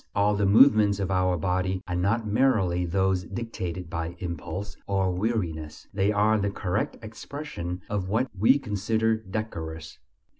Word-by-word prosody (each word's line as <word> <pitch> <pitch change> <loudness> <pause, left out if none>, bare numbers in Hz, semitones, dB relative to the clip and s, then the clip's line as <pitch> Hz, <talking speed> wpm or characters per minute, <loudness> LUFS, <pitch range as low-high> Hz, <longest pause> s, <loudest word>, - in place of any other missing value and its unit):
All 100 +1 +3
the 100 -1 +1
movements 105 -2 +6
of 95 -1 -1
our 90 -1 +2
body 95 +2 -1
are 90 - -2
not 105 +6 +1
merely 100 -6 +2
those 95 +1 +1
dictated 95 -7 -5
by 85 0 -4
impulse 90 +3 -5
or 95 -2 +1
weariness; 90 -6 -2
they 100 +1 +2
are 105 +1 +3
the 100 0 0
correct 100 +1 -2
expression 110 - -6
of 100 -3 -2
what 115 +6 +1
we 110 +8 +5
consider 110 -2 0
decorous. 85 -7 -6
100 Hz, 145 wpm, -26 LUFS, 90-110 Hz, -, movements